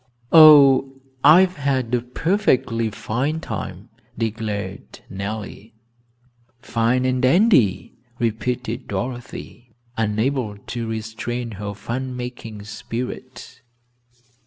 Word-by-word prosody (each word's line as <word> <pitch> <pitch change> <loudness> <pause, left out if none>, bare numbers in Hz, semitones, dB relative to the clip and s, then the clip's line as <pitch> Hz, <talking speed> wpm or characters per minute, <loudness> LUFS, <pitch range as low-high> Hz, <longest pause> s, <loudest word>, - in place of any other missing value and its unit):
"Oh, 140 -4 +8 0.3
I've 180 +5 +6
had 130 -4 -1
a 120 - +2
perfectly 125 - 0
fine 130 +9 -2
time," - - -6 0.3
declared 105 -4 -4
Nellie. 105 +2 -6 0.8
"Fine 120 +1 0
and 130 -1 0
dandy," 135 - +3 0.2
repeated 120 0 -2
Dorothy, 125 -1 -6 0.2
unable 110 +1 -1
to 115 +3 -6
restrain 110 +2 -4
her 100 0 -6
fun 125 +4 -5
making 120 -4 -7
spirit. 120 +4 -7
120 Hz, 85 wpm, -21 LUFS, 110-130 Hz, 0.8 s, Oh